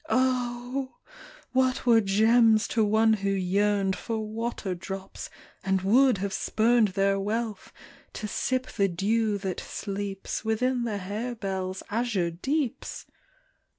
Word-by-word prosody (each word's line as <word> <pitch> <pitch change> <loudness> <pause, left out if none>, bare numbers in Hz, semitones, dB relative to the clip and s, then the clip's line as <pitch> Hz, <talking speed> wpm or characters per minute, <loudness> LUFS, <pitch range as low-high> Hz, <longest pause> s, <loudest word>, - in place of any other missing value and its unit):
Oh! 255 0 0 0.6
what 260 -1 +1
were 230 -2 +6
gems 220 +2 +4
to 225 - +2
one 220 +1 +4
who 200 - 0
yearned 195 +1 +1
For 225 -2 -4
water 220 -2 -3
drops, 190 +2 -7 0.3
and 190 -1 0
would 250 +4 +4
have 195 +1 -3
spurned 225 +2 +3
Their 195 0 +2
wealth, 215 +1 -3 0.4
to 215 - -5
sip 255 +5 -1
the 200 -5 0
dew 210 +4 0
that 190 -2 -4
sleeps 200 -1 -5
Within 240 +3 0
the 215 -3 -2
harebells' 195 -2 -4
azure 210 -6 0
deeps 265 - -3
215 Hz, 120 wpm, -27 LUFS, 195-240 Hz, 0.6 s, were